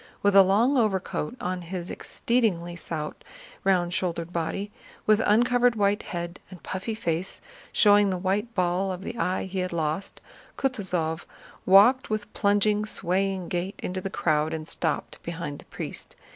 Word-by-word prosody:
With 200 -1 +3
a 195 - +11
long 220 +9 +3
overcoat 195 -4 0
on 180 0 -3
his 175 0 -5
exceedingly 190 -8 0
stout, 160 -3 -5 0.4
round 180 -2 +2
shouldered 175 -2 -2
body, 195 +5 -2 0.3
with 215 0 +4
uncovered 245 +3 +4
white 205 -1 +2
head 175 -1 -5
and 185 -3 -12
puffy 195 +4 -4
face 170 -4 -2 0.3
showing 205 -1 +5
the 185 - -1
white 200 +5 -1
ball 180 +1 +1
of 185 +1 -6
the 235 - -5
eye 185 +1 0
he 190 0 -4
had 180 0 -2
lost, 160 +2 -2 0.4
Kutúzov 185 -11 -1 0.4
walked 210 +8 +6
with 215 -1 -3
plunging, 205 +1 +2
swaying 190 -1 -1
gait 180 +3 -3
into 185 +1 -3
the 195 - -3
crowd 155 -4 +1
and 155 -1 -6
stopped 160 -3 -2
behind 165 -4 -5
the - - -14
priest. - - -7
190 Hz, 155 wpm, -26 LUFS, 175-205 Hz, 0.4 s, a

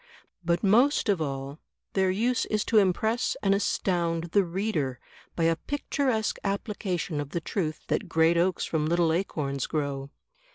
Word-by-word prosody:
But 170 +2 0
most 235 +5 +4
of 195 -5 +2
all 140 0 -4 0.3
their 190 -1 +2
use 230 +6 +1
is 215 -1 0
to 220 - +4
impress 220 +5 +1
and 195 -1 +4
astound 170 -4 0
the 200 +1 +4
reader 170 - -2 0.4
by 165 - 0
a 165 0 +3
picturesque 260 - -1
application 195 -6 -2
of 145 - -6
the 170 - -2
truth 155 -1 -3
that - - -2
great 160 +1 +4
oaks 175 +2 +1
from 155 -2 -1
little 170 -1 +2
acorns 145 -7 -2
grow. 140 -3 -2
175 Hz, 155 wpm, -27 LUFS, 155-205 Hz, 0.4 s, most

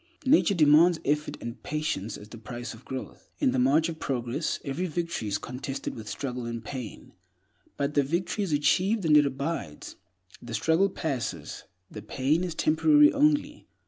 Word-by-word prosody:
Nature 260 -7 +4
demands 160 +2 +5
effort 150 +2 0
and 120 +1 -7
patience 150 -9 -3
as 105 - -12
the 115 - -10
price 120 +2 -7
of 115 +3 -14
growth. 130 -1 -8
In - - +2
the 130 - 0
march 140 +6 +3
of 165 -2 -6
progress, 130 +3 -2
every 155 +7 -2
victory 170 -8 -3
is 100 -1 0
contested 130 +4 -5
with 110 -2 -8
struggle 125 -1 -4
and 115 -1 -5
pain; 125 -5 -7 0.7
but 140 +1 -1
the 145 - +4
victory 170 +8 -1
is 190 - -3
achieved, 185 +8 +2
and 155 -2 +5
it 145 -1 +6
abides. 140 - -5 0.4
The 120 -1 -6
struggle 160 - +2
passes; 120 - -4 0.3
the 105 - -8
pain 135 - 0
is 175 -3 -4
temporary 295 - +5
only. 295 +1 +1
145 Hz, 170 wpm, -27 LUFS, 120-170 Hz, 0.7 s, it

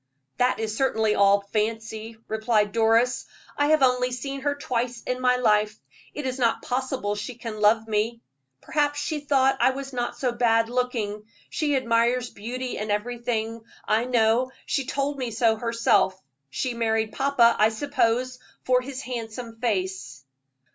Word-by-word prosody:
"That 250 -1 +2
is 220 -1 -2
certainly 220 -4 +1
all 200 0 +4
fancy," 220 +1 -2
replied 220 -1 +1
Doris. 230 +2 +2 0.3
"I 290 - +2
have 310 -2 +4
only 250 -1 +3
seen 275 +2 -5
her 285 +1 0
twice 245 -3 -3
in 255 0 -3
my 250 0 +4
life; 210 -3 +2 0.4
it 295 - -4
is 260 0 -3
not 230 -2 +1
possible 255 -4 -2
she 210 +4 -5
can 225 -3 -7
love 220 +1 +4
me. 220 +2 -1 0.4
Perhaps 290 -1 0
she 310 0 -2
thought 270 -2 +2
I - - +6
was 275 +1 -5
not 240 -1 -3
so 255 -2 0
bad 230 -1 +2
looking 230 -4 -2 0.3
she 295 -2 0
admires 240 0 +1
beauty 250 +4 -5
in 210 +1 -4
everything, 230 +1 -2 0.3
I 220 +3 +2
know; 240 0 +2 0.2
she 275 -3 -1
told 280 0 -2
me 250 -2 -2
so 225 0 +2
herself. 230 -4 +2 0.3
She 250 - -2
married 220 -2 0
papa, 260 -4 +4
I 215 +1 +5
suppose, 255 0 0 0.2
for 250 0 +3
his 265 +1 -7
handsome 230 -1 -6
face." 185 - -2
235 Hz, 155 wpm, -25 LUFS, 220-255 Hz, 0.4 s, I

